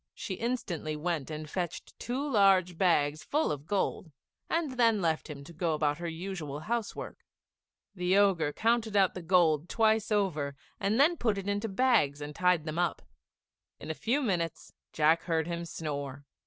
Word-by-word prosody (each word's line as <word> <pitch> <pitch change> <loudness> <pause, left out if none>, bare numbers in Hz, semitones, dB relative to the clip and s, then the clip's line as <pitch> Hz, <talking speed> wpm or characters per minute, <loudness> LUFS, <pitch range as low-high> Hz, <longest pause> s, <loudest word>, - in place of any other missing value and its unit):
She 195 - -5
instantly 185 -8 -3
went 155 -2 -2
and 155 0 -5
fetched 175 +1 -4
two 265 +4 -2
large 195 -7 +4
bags 155 -4 +2
full 300 - 0
of 145 0 -5
gold; 190 -4 -1 0.4
and 330 -4 0
then 230 -4 +3
left 160 -3 -1
him 140 -2 -7
to 170 +4 -12
go 165 -1 0
about 150 0 0
her 170 - -4
usual 165 -4 -5
house 230 +3 -2
work. - - -8 0.7
The 180 0 +1
Ogre 185 -7 +3
counted 225 +2 +1
out 190 -2 +4
the 180 - -6
gold 165 -2 +3
twice 220 -1 +2
over, 160 -9 0 0.2
and 210 +5 +1
then 330 +5 +5
put 220 -6 0
it 195 0 -5
into 205 +2 -1
the 195 - -9
bags 215 - +3
and 150 0 -6
tied 180 -2 +2
them 155 +1 -3
up. 175 -1 0 0.8
In 160 - -5
a - - -2
few 250 - 0
minutes 170 - -2 0.2
Jack 160 +2 +3
heard 160 -2 +1
him 170 0 -4
snore. 145 -4 -5
175 Hz, 180 wpm, -30 LUFS, 155-210 Hz, 0.8 s, then